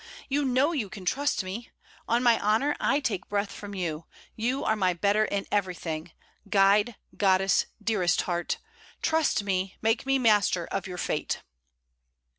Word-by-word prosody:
You 285 +2 +1
know 260 +4 +3
you 255 - -2
can 195 -3 -9
trust 270 +1 0
me. 195 +6 -6 0.4
On 235 +2 +2
my 235 -2 +4
honour, 225 +8 +2
I 285 - +2
take 205 -9 -3
breath 200 0 -1
from 205 -1 -8
you. 165 -4 -3 0.3
You 245 +5 -1
are 220 - +2
my 185 -4 +2
better 205 +4 +2
in 200 -1 -2
everything 175 -5 -2 0.4
guide, 205 +3 +4 0.2
goddess, 195 -1 +3
dearest 205 -5 +1
heart! 175 -1 -2 0.5
Trust 320 -9 +2
me; 190 -1 -2
make 225 +4 0
me 270 0 +3
master 210 -7 +3
of 190 - -4
your 180 -1 -6
fate.' - - -2
205 Hz, 155 wpm, -27 LUFS, 185-235 Hz, 0.5 s, my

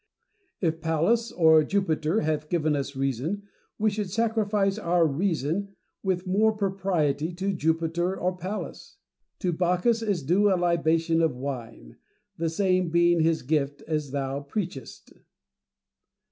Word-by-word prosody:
If 165 -3 0
Pallas 170 +9 +1
or 160 -2 +5
Jupiter 165 +1 0
hath 155 -1 -2
given 155 -3 +1
us 140 0 -3
reason, 135 - -2 0.4
•we 215 0 +2
should 205 -2 -3
sacrifice 210 -2 +1
our 175 -3 +2
reason 170 +4 -1 0.3
with 185 -1 -1
more 210 +4 +3
propriety 185 -7 0
to 195 +3 -2
Jupiter 165 +2 0
or 180 +1 0
Pallas. 185 +4 -6 0.4
To 180 -2 0
Bacchus 180 +7 +1
is 200 -8 -1
due 195 +8 +3
a 185 - +3
libation 165 -1 +2
of 160 -5 +1
wine; 120 - -7 0.4
the 165 0 -1
same 185 0 +1
being 170 +1 +3
his 160 0 +2
gift, 145 0 -1
as 150 -3 -2
thou 135 0 -2
preachest. 145 -1 -6
170 Hz, 130 wpm, -26 LUFS, 155-195 Hz, 0.4 s, or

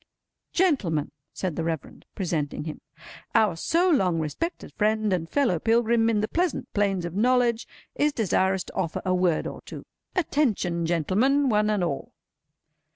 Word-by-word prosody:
"Gentlemen," 215 - +1 0.2
said 185 -5 -3
the 165 - -2
Reverend, 160 -3 -5
presenting 165 -8 -2
him, 155 -1 -7 0.5
"our 215 -6 +4
so 335 - +1
long 190 - +2
respected 245 - -4
friend 215 -1 +1
and 165 -2 -2
fellow 250 - +1
pilgrim 230 +2 +3
in 215 -2 +1
the 215 - 0
pleasant 350 +5 -1
plains 195 -4 +1
of 170 - -5
knowledge, 240 +2 +2 0.3
is 300 +1 +2
desirous 190 -5 +1
to - - -12
offer 170 -4 -2
a 185 - +2
word 180 -3 +1
or - - -6
two. - - -10 0.3
Attention, 215 - 0
gentlemen, 225 - +2
one 210 -1 +2
and 210 -4 +1
all!" 145 -6 -3
205 Hz, 155 wpm, -26 LUFS, 170-240 Hz, 0.5 s, our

